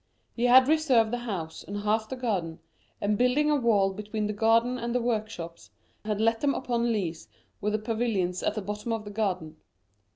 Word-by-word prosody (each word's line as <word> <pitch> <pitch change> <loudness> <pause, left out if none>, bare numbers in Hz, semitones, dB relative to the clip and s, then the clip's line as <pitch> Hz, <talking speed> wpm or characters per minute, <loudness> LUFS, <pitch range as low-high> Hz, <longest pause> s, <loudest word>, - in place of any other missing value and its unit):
He 240 - 0
had 255 +1 +7
reserved 275 -8 +3
the 245 - -1
house 185 -9 -5
and 200 - -6
half 215 +1 0
the - - -3
garden, 190 -10 -2 0.4
and 205 0 0
building 270 +5 +3
a - - +4
wall 210 -7 +2
between 210 +1 -4
the 210 - -2
garden 230 +4 +2
and 235 +1 -3
the - - +3
workshops, 215 -8 -4 0.4
had 210 -1 -1
let 225 +1 +2
them 285 -1 +2
upon 240 -2 0
lease 175 -7 -3 0.3
with 210 +1 0
the - - +2
pavilions 215 -5 -1
at - - -1
the 215 - -3
bottom 210 +3 -3
of 220 -1 -4
the 205 - -7
garden. 185 -7 -2
220 Hz, 195 wpm, -27 LUFS, 205-240 Hz, 0.4 s, had